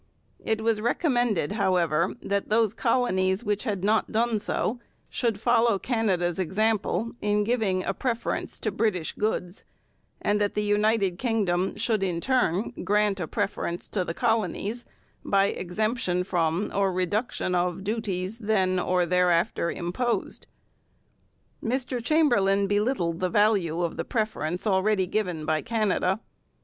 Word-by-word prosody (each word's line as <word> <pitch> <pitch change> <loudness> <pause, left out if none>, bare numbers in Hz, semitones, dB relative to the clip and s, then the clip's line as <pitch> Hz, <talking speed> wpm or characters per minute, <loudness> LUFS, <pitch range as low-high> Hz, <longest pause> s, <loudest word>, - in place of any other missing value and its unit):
It 220 0 0
was 220 -1 +1
recommended, 240 - +1
however, 180 -5 +1
that 200 0 -1
those 220 -1 +3
colonies 205 -5 +1
which 210 +1 -1
had 200 -5 -2
not 215 +2 +2
done 225 0 +1
so 220 +3 -2 0.3
should 230 -4 -1
follow 230 -2 +3
Canada's 190 -7 0
example 210 +3 0
in 210 0 +1
giving 205 -5 0
a 195 - -1
preference 235 +2 -2
to 215 - -1
British 200 -5 0
goods, 205 -3 -2 0.6
and 210 0 +1
that 205 - 0
the 210 - 0
United 205 -3 +1
Kingdom 195 -7 0
should 215 -1 0
in 180 -3 -1
turn 225 -4 +1
grant 205 +1 +2
a 175 - -3
preference 195 -4 -3
to 190 - -1
the 165 -1 -5
colonies 225 0 -1 0.4
by 195 0 +3
exemption 185 -1 -1
from 175 +1 0
or 195 -1 +2
reduction 185 +2 -1
of 180 +1 0
duties 205 -1 -3
then 190 -4 +1
or 180 0 +1
thereafter 175 -1 +2
imposed. 185 +9 -2 1.2
Mr 250 0 -2
Chamberlain 205 -10 +3
belittled 205 -5 0
the 185 - 0
value 185 -5 +2
of 170 - -2
the - - -1
preference 200 -6 -2
already 195 -1 +2
given 180 -5 -2
by 155 0 +1
Canada. 210 -3 0
205 Hz, 135 wpm, -26 LUFS, 180-225 Hz, 1.2 s, those